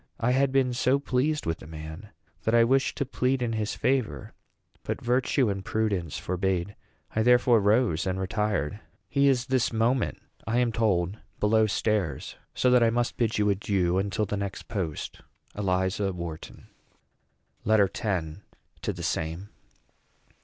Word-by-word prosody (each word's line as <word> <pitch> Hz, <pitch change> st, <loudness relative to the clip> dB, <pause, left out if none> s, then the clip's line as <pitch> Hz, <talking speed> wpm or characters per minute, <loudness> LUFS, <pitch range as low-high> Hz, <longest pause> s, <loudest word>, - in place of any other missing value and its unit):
I 120 Hz, +1 st, +2 dB
had 135 Hz, +1 st, +2 dB
been 130 Hz, -2 st, +2 dB
so 130 Hz, +2 st, +2 dB
pleased 140 Hz, +2 st, 0 dB
with 80 Hz, 0 st, -2 dB
the -, -, -11 dB
man 80 Hz, +5 st, -8 dB, 0.3 s
that 110 Hz, -, +1 dB
I 115 Hz, -, +6 dB
wished 135 Hz, +3 st, +2 dB
to 140 Hz, -, 0 dB
plead 130 Hz, -1 st, 0 dB
in 115 Hz, -1 st, -1 dB
his 110 Hz, -1 st, -2 dB
favor; 115 Hz, -, -1 dB, 0.5 s
but -, -, -3 dB
virtue 125 Hz, +1 st, +1 dB
and 100 Hz, -2 st, -2 dB
prudence 100 Hz, -7 st, -1 dB
forbade. 95 Hz, +1 st, -1 dB, 0.4 s
I 110 Hz, -, +2 dB
therefore 120 Hz, 0 st, +5 dB
rose 105 Hz, -4 st, +2 dB
and 95 Hz, 0 st, -1 dB
retired. 100 Hz, -3 st, -1 dB, 0.3 s
He 140 Hz, -1 st, +3 dB
is 130 Hz, -3 st, +2 dB
this 130 Hz, -2 st, +1 dB
moment, 115 Hz, +2 st, +1 dB, 0.3 s
I 115 Hz, +2 st, +1 dB
am 125 Hz, -1 st, +2 dB
told, 105 Hz, -4 st, 0 dB, 0.2 s
below 110 Hz, +1 st, +3 dB
stairs; 100 Hz, -9 st, -1 dB, 0.2 s
so 125 Hz, -, +3 dB
that 125 Hz, -1 st, +6 dB
I 115 Hz, -, +5 dB
must 120 Hz, +1 st, 0 dB
bid 115 Hz, -2 st, 0 dB
you 105 Hz, -1 st, +3 dB
adieu 95 Hz, -2 st, +1 dB
until 100 Hz, +2 st, -1 dB
the 105 Hz, -, -3 dB
next 100 Hz, -1 st, -5 dB
post. 90 Hz, -8 st, -4 dB, 0.3 s
ELIZA 95 Hz, 0 st, 0 dB
WHARTON. 85 Hz, -3 st, -7 dB, 1.0 s
LETTER 105 Hz, -3 st, +3 dB
X. 90 Hz, -8 st, -2 dB, 0.4 s
TO -, -, -2 dB
THE -, -, -7 dB
SAME. 80 Hz, +5 st, -2 dB
105 Hz, 155 wpm, -27 LUFS, 95-125 Hz, 1.0 s, I